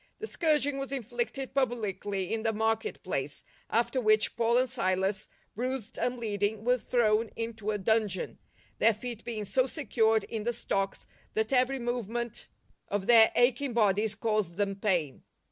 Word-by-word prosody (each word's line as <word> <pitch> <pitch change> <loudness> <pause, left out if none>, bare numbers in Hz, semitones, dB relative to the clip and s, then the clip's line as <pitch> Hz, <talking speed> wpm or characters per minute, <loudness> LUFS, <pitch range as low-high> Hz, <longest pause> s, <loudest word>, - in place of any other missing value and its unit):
The 435 - -5
scourging 295 - +1
was 275 0 -4
inflicted 245 +1 -3
publicly 205 -7 -1
in 225 - -1
the 225 0 0
market 225 - -1
place, - - -3 0.3
after 235 +3 +1
which 215 -1 +3
Paul 235 0 +2
and 255 +1 +3
Silas, 195 -4 0 0.3
bruised 250 0 -3
and 250 0 0
bleeding, 210 -2 -1
were 250 +1 +3
thrown 225 -2 +2
into 225 -2 -4
a 210 - +1
dungeon, 210 -1 0 0.4
their 225 -2 +5
feet 235 +1 -6
being 220 -3 -4
so 255 +5 +2
secured 225 -7 +1
in 220 -2 -5
the 240 +2 0
stocks 195 -3 -2 0.3
that 220 +4 0
every 255 +1 +3
movement 240 -1 -3 0.4
of 205 -1 -2
their 225 -1 +7
aching 250 +2 +2
bodies 215 -1 +2
caused 215 -6 -1
them 200 0 0
pain. 180 -9 -1
225 Hz, 155 wpm, -29 LUFS, 210-245 Hz, 0.4 s, their